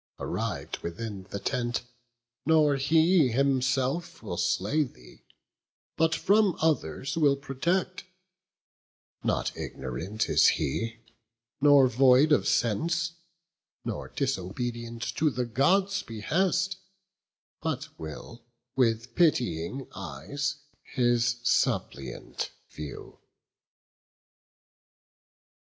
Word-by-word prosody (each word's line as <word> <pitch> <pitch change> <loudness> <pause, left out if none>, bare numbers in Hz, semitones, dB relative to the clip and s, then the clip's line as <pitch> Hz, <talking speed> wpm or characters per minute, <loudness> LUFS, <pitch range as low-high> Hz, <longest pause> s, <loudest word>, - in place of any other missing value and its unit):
Arriv'd - - -3
within 95 +2 -6
the - - -4
tent, 120 +3 -1 0.6
nor 150 -1 +4
he 160 +3 +4
himself 135 +3 0
Will 100 -5 -4
slay 90 - +1
thee, 60 - -8 0.7
but 160 0 +2
from 205 -2 +3
others 135 - 0
will 145 -3 +4
protect; 170 +7 -2 1.2
Not - - 0
ignorant 80 - -4
is - - +5
he, 115 +10 -2 0.6
nor 145 -2 +7
void 130 +4 +5
of 150 - +4
sense, 165 - +1 0.7
Nor - - -4
disobedient 120 0 -3
to 155 0 +3
the 125 -2 -2
Gods' 185 - +2
behest, 185 - 0 0.8
But 155 -2 -3
will 80 +9 -8 0.3
with 115 -1 +1
pitying 125 - +1
eyes 140 - -4 0.2
his 120 -1 +1
suppliant - - -1 0.2
view." 75 -2 -9
130 Hz, 85 wpm, -28 LUFS, 115-155 Hz, 1.2 s, nor